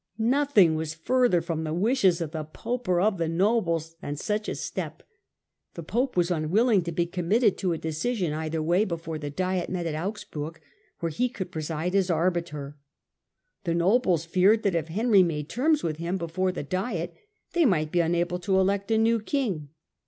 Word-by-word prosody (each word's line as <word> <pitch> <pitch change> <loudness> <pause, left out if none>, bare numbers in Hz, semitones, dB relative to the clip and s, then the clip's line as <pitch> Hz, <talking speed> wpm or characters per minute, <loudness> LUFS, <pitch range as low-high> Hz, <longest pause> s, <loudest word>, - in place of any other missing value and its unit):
Nothing 235 - +4
was 160 0 -3
further 240 +1 +2
from 160 -1 -3
the 155 0 -2
wishes 195 -3 +2
of 160 -3 -3
the 160 -2 -4
pope 235 +10 -5
or 180 -1 +3
of 195 0 +2
the 165 - 0
nobles 170 -3 +1
than 145 - -4
such 210 +8 -2
a - - -3
step. - - -5 0.7
The 170 - -6
pope 245 - -1
was 175 0 +2
unwilling 190 +7 +3
to 170 - -2
be 170 +1 0
committed 190 +5 +2
to 185 -3 0
a - - -2
decision 160 +3 -2
either 155 0 -2
way' 175 +5 +3
before 165 -5 -4
the 145 -1 -4
diet 185 +4 -1
met 180 -2 -3
at 165 - -2
Augsburg, 160 -3 -5 0.4
where 165 -1 -1
he 245 +11 0
could 190 -7 -6
preside 160 +2 -3
as 195 -2 +2
arbiter; 165 -4 -1 0.9
the 170 -3 0
nobles 180 -2 +2
feared 190 +6 +3
that, 200 - +2
if 165 -2 -1
Henry 205 +4 +4
made 155 -4 -1
terms 300 +4 +1
with 155 -2 -2
him 170 +3 -2
before 185 +2 -1
the 180 - -5
diet, 185 - -3 0.4
they 345 - +3
might 155 - +2
be 175 - +2
unable 175 +1 +1
to 190 +1 +1
elect 200 +2 +1
a 220 - +3
new 225 +1 +3
king. 210 - -2
175 Hz, 190 wpm, -26 LUFS, 160-210 Hz, 0.9 s, Nothing